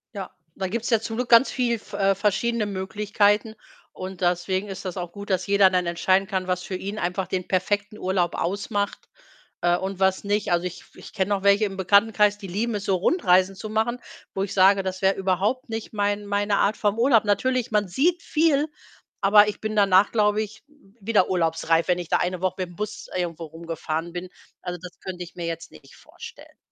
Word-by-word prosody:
Ja. 195 -2 -6 0.2
Da 190 - -3
gibt‘s 230 +5 -3
ja 230 -3 +4
zum 225 +1 -5
Glück 250 -1 -2
ganz 235 +3 +7
viel 240 -3 0
v - - -19
äh, 195 0 +2
verschiedene 215 +3 0
Möglichkeiten 205 +2 0 0.4
und 185 0 -8
deswegen 180 +2 0
ist 195 -1 -7
das 185 -2 -5
auch 175 -1 -5
gut, 200 +2 -9
dass 185 0 0
jeder 200 -1 +5
dann 180 -1 0
entscheiden 185 +3 +1
kann, 185 -1 -2
was 180 0 -1
für 190 - -5
ihn 200 +3 -5
einfach 180 +1 -2
den 185 -1 -3
perfekten 205 +3 -1
Urlaub 185 -3 0
ausmacht, 200 +2 -3 0.5
äh, 175 0 +3
und 190 0 -5
was 190 0 +2
nicht. 205 -1 -1
Also, 175 0 +1
ich 180 0 -5
f - - -23
ich - - -12
kenne 190 -2 -1
noch 200 -2 0
welche 200 +2 +4
im 195 -2 -5
Bekanntenkreis, 205 +2 +3
die 205 -2 -9
lieben 215 +5 -2
es 205 - -4
so, 195 - +2
Rundreisen 185 - +3
zu 215 +3 -7
machen, 225 +3 0 0.3
wo 195 - -1
ich 200 0 -4
sage, 195 +1 +5
das 185 0 -4
wäre 195 0 +3
überhaupt 195 +7 -1
nicht 225 -1 -5
mein 205 0 -1
meine 205 0 0
Art 205 +2 +2
vom 205 0 0
Urlaub. 235 -3 +4
Natürlich, 245 +4 0
man 210 -2 +1
sieht 330 - +1
viel, 305 -3 +2 0.5
aber 205 +1 +6
ich 210 - -4
bin 215 0 -3
danach, 195 -1 +4
glaube 210 -1 +2
ich, 220 +1 -8
wieder 225 -8 -1
urlaubsreif, 165 -2 +1
wenn 180 -1 +2
ich 175 -2 -6
da - - +3
eine 180 0 -2
Woche 185 -1 0
mit 180 - -3
‘m - - -15
Bus 210 +4 -5
irgendwo 170 -2 -3
rumgefahren 165 +1 -5
bin. 180 +1 -6 0.3
Also, 180 0 -5
das 180 -1 -11
könnte 180 -1 -6
ich 170 - -13
mir 175 - -5
jetzt 165 0 -5
nicht - - -16
vorstellen. - - -13
195 Hz, 210 wpm, -24 LUFS, 185-210 Hz, 0.5 s, ganz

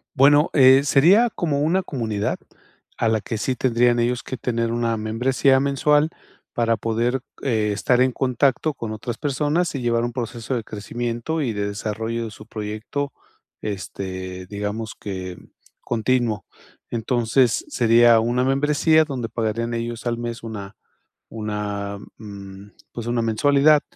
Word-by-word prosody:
Bueno, 145 +3 +5
eh, 135 -1 +7
sería 185 - +5
como 145 -4 -1
una 180 +5 +2
comunidad 110 - -2 0.6
a 115 - +2
la 110 -1 +2
que 110 +1 -4
sí 130 +3 -1
tendrían 120 -1 +2
ellos 120 +1 +1
que 130 - -6
tener 115 -1 -1
una 115 -1 0
membresía 125 +5 +2
mensual 145 +2 +2 0.4
para 115 -1 +1
poder, 115 +4 0 0.2
eh, 110 -5 +1
estar 125 +4 +2
en 130 0 +4
contacto 135 +3 +1
con 115 -2 -5
otras 110 +2 -5
personas 150 +5 0
y 135 - -3
llevar 120 -1 +1
un 120 - -2
proceso 120 0 -4
de 115 - -2
crecimiento 120 +8 -3
y 125 -5 0
de 100 0 -2
desarrollo 110 +3 -3
de 110 - -7
su 105 +1 -12
proyecto, 110 +6 -4 0.5
este, 95 -2 -5
digamos 105 +2 -4
que 95 -2 -6 0.5
continuo. 120 -2 0 0.5
Entonces, 120 +1 +1
sería 115 -1 +5
una 120 +3 +1
membresía 150 +4 +3
donde 125 -6 -4
pagarían 115 +1 -2
ellos 115 +1 -4
al 120 -1 0
mes 120 -1 -5
una 105 -3 -7 0.6
una, 105 -2 -4 0.2
mm, 100 -2 -10 0.2
pues, 115 -1 -6
una 120 0 +1
mensualidad, 145 +6 +4
115 Hz, 145 wpm, -22 LUFS, 110-130 Hz, 0.6 s, eh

